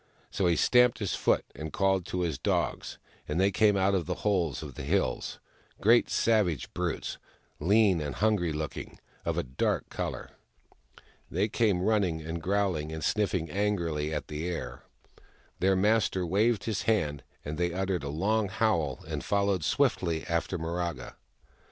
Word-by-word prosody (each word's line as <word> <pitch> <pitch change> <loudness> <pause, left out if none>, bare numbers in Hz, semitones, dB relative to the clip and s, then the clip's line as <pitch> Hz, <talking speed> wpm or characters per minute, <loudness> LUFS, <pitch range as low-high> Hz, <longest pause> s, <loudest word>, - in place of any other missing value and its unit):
So 95 - +1
he 85 - +3
stamped 125 +4 +4
his 100 -4 -2
foot - - +1
and 80 0 -6
called 95 0 +1
to 90 - -2
his 80 -6 -1
dogs, - - -1 0.3
and 75 +4 -1
they 100 +1 +4
came 105 +1 +3
out 95 +1 +2
of 90 -4 0
the 90 - -1
holes 90 -9 +1
of 70 -3 -8
the - - -7
hills 70 -3 -1 0.2
— - - -33
great 115 +3 +4
savage 105 - +1
brutes, 90 -2 -3 0.4
lean 95 0 +4
and 75 -2 -4
hungry 105 -5 +1
looking, 75 0 -5 0.3
of - - -1
a - - +1
dark 65 +1 -1
colour. - - -4 1.0
They 95 +5 +1
came, 100 -5 +1
running 100 -6 +1
and 80 +1 -5
growling, 90 -5 0
and 80 0 -5
sniffing 95 -7 0
angrily 85 -7 -1
at 75 -2 -3
the 75 +3 -4
air. 65 -8 -5 0.8
Their 95 +1 +3
master 100 -2 +2
waved 105 +4 +2
his 110 -1 -2
hand, 75 -10 +1 0.2
and 75 +2 -4
they 85 0 +1
uttered 95 -1 -1
a 70 - -3
long 100 +7 0
howl 85 - 0
and - - -4
followed 100 -4 +1
swiftly 80 +2 +1
after 85 +2 -1
Miraga. 85 0 -3
90 Hz, 165 wpm, -29 LUFS, 80-100 Hz, 1.0 s, stamped